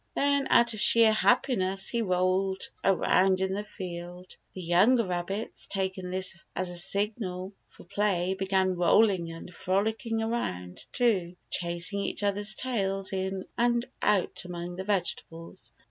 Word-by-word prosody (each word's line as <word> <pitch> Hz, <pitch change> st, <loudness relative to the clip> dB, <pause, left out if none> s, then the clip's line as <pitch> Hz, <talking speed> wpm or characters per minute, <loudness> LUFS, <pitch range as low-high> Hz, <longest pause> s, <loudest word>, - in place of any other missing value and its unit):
Then 280 Hz, -1 st, +2 dB
out 235 Hz, -1 st, +5 dB
of 215 Hz, -, -4 dB
sheer 230 Hz, -1 st, +7 dB
happiness 215 Hz, -4 st, +2 dB
he 235 Hz, -, 0 dB
rolled 185 Hz, 0 st, 0 dB
around 190 Hz, 0 st, +3 dB
in 190 Hz, 0 st, 0 dB
the 205 Hz, +2 st, -2 dB
field. 180 Hz, -2 st, -8 dB, 0.2 s
The 185 Hz, -, -8 dB
younger 205 Hz, +8 st, +4 dB
rabbits, 185 Hz, +4 st, -4 dB
taking 190 Hz, -2 st, -3 dB
this 185 Hz, -2 st, -2 dB
as 185 Hz, -1 st, -2 dB
a -, -, -7 dB
signal 195 Hz, 0 st, -2 dB, 0.2 s
for -, -, -16 dB
play, 190 Hz, -1 st, 0 dB
began 190 Hz, -1 st, +1 dB
rolling 180 Hz, -1 st, +3 dB
and 165 Hz, +2 st, -10 dB
frolicking 220 Hz, +5 st, -1 dB
around, 90 Hz, -, -3 dB
too, 195 Hz, -8 st, +1 dB, 0.2 s
chasing 175 Hz, +3 st, -1 dB
each 200 Hz, -, -2 dB
other's 205 Hz, +1 st, 0 dB
tails 195 Hz, -7 st, -1 dB
in 190 Hz, 0 st, -3 dB
and 240 Hz, 0 st, +2 dB, 0.2 s
out 195 Hz, -3 st, +1 dB
among 175 Hz, 0 st, -6 dB
the 190 Hz, -, -4 dB
vegetables. 175 Hz, -4 st, -3 dB
190 Hz, 140 wpm, -28 LUFS, 180-210 Hz, 0.2 s, sheer